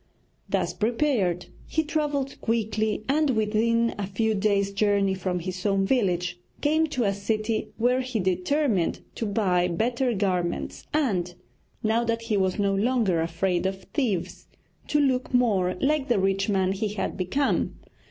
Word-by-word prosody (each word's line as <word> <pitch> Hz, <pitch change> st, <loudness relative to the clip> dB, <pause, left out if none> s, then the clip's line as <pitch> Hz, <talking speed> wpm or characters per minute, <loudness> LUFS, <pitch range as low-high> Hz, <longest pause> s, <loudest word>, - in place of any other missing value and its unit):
Thus -, -, 0 dB
prepared, 220 Hz, -, 0 dB, 0.2 s
he 315 Hz, -, 0 dB
travelled 295 Hz, -3 st, -2 dB
quickly, 220 Hz, -1 st, 0 dB
and 300 Hz, +2 st, +2 dB
within 230 Hz, 0 st, +2 dB
a 200 Hz, -, -2 dB
few 220 Hz, +3 st, 0 dB
days' 200 Hz, -1 st, +1 dB
journey 200 Hz, -1 st, +2 dB
from 185 Hz, -1 st, -2 dB
his 185 Hz, +1 st, -5 dB
own 195 Hz, -2 st, +2 dB
village 180 Hz, -7 st, 0 dB, 0.2 s
came 315 Hz, +2 st, +2 dB
to 255 Hz, -5 st, -1 dB
a 200 Hz, -2 st, +2 dB
city 215 Hz, +2 st, -1 dB
where 250 Hz, +3 st, +2 dB
he 255 Hz, -3 st, -2 dB
determined 190 Hz, -, +1 dB
to 225 Hz, -, -3 dB
buy 185 Hz, -4 st, +2 dB
better 235 Hz, +7 st, 0 dB
garments 180 Hz, -3 st, -2 dB
and 190 Hz, -, 0 dB, 0.5 s
now 225 Hz, +2 st, +2 dB
that 230 Hz, 0 st, -1 dB
he 230 Hz, -2 st, -1 dB
was 190 Hz, -2 st, +1 dB
no 200 Hz, -1 st, +1 dB
longer 205 Hz, -5 st, +2 dB
afraid 175 Hz, +2 st, 0 dB
of 190 Hz, 0 st, -5 dB
thieves 225 Hz, -, -2 dB, 0.4 s
to 295 Hz, -, +2 dB
look 260 Hz, -2 st, +1 dB
more 195 Hz, -7 st, +2 dB
like 280 Hz, 0 st, +1 dB
the 240 Hz, -, +2 dB
rich 195 Hz, +1 st, +1 dB
man 190 Hz, -2 st, +2 dB
he 205 Hz, +3 st, -1 dB
had 210 Hz, 0 st, -3 dB
become. 230 Hz, +11 st, 0 dB
215 Hz, 150 wpm, -26 LUFS, 190-245 Hz, 0.5 s, and